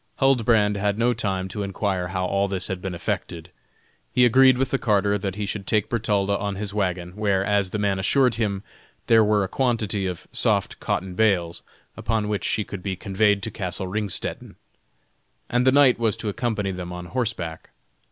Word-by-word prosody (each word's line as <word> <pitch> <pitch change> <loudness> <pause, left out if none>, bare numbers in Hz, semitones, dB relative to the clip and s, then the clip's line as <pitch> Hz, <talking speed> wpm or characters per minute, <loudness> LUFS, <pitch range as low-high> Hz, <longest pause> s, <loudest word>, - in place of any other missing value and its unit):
Huldbrand 115 -6 +3
had 100 +1 0
no 120 +2 +2
time 95 -4 -2
to 105 - -5
inquire 95 -2 -2
how 90 +1 -2
all 100 +2 +1
this 95 -1 -2
had 95 -2 -3
been 95 -2 -4
effected. 85 0 -4 0.6
He 125 - +4
agreed 130 +1 +6
with 130 0 -1
the 135 - +1
carter 100 -2 +2
that 95 -1 -3
he 105 0 -3
should 100 -1 -5
take 105 -2 +1
Bertalda 100 -3 +1
on 100 -1 -2
his 100 0 -4
wagon, 90 -4 -1
where, 100 -2 +1
as 100 -2 +1
the 105 - -3
man 100 -2 0
assured 125 +5 +3
him, 105 -3 -2 0.4
there 115 -1 +5
were 105 -1 +2
a - - -2
quantity 110 -5 0
of 90 -2 -6
soft - - 0
cotton 95 +1 -2
bales, 90 -5 +1 0.3
upon 110 -2 -1
which 105 -3 -2
she 110 - +1
could 100 -2 -8
be 95 0 -3
conveyed 100 +1 +1
to 110 - -3
castle 95 -2 -4
Ringstetten, 100 +1 -3 1.0
and 125 +1 +2
the - - +7
knight 135 -3 +5
was 115 -3 +1
to 110 - -3
accompany 105 -2 -2
them 90 -1 -6
on 90 0 -6
horseback. 90 -8 -3
100 Hz, 190 wpm, -24 LUFS, 95-110 Hz, 1.0 s, the